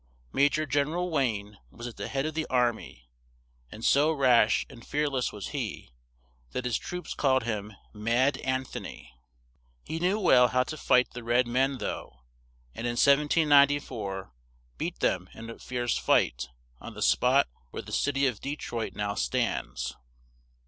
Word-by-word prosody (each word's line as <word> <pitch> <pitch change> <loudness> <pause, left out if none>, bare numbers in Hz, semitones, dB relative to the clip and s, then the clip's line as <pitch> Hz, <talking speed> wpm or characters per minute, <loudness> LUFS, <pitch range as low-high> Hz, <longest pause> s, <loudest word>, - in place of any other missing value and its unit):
Ma 140 - +4
jor 155 +1 -1
Gen 145 0 +1
er 160 +3 -3
al 180 0 -1
Wayne 105 -8 -1
was 120 - -10
at 120 - -6
the - - -5
head 135 +1 -1
of 155 - -2
the 160 0 -2
ar 125 -2 +3
my, 60 - -12 0.7
and 110 - -7
so 145 +3 +4
rash 125 -7 +4
and 120 -4 -13
fear 150 +4 0
less 130 -3 -1
was 105 -2 -6
he, - - -5 0.6
that 125 - -3
his 125 -3 0
troops 180 0 -6
called 130 -3 +2
him 105 -2 -3 0.2
"Mad 120 +6 +1
An 130 0 -1
tho - - -7
ny." 65 - -10 0.7
He 160 - -4
knew 185 +5 +1
well 125 -11 +6
how 125 +1 +2
to 155 - -6
fight 125 -4 +3
the 120 0 -8
red 120 +2 +3
men 130 +3 +1
though, 60 - -6 0.5
and 120 - -4
in 120 - -1
1794 140 - +3 0.5
beat - - -4
them - - 0
in 115 +1 -8
a - - -11
fierce 120 -1 -2
fight, - - +2 0.3
on - - -9
the - - -3
spot - - +4 0.2
where - - -6
the - - -10
cit 145 -1 0
y 135 - +1
of 125 -6 +1
De 140 +2 -3
troit 115 -6 -5
now 105 -1 -2
stands. 60 -4 -2
125 Hz, 180 wpm, -28 LUFS, 110-145 Hz, 0.7 s, well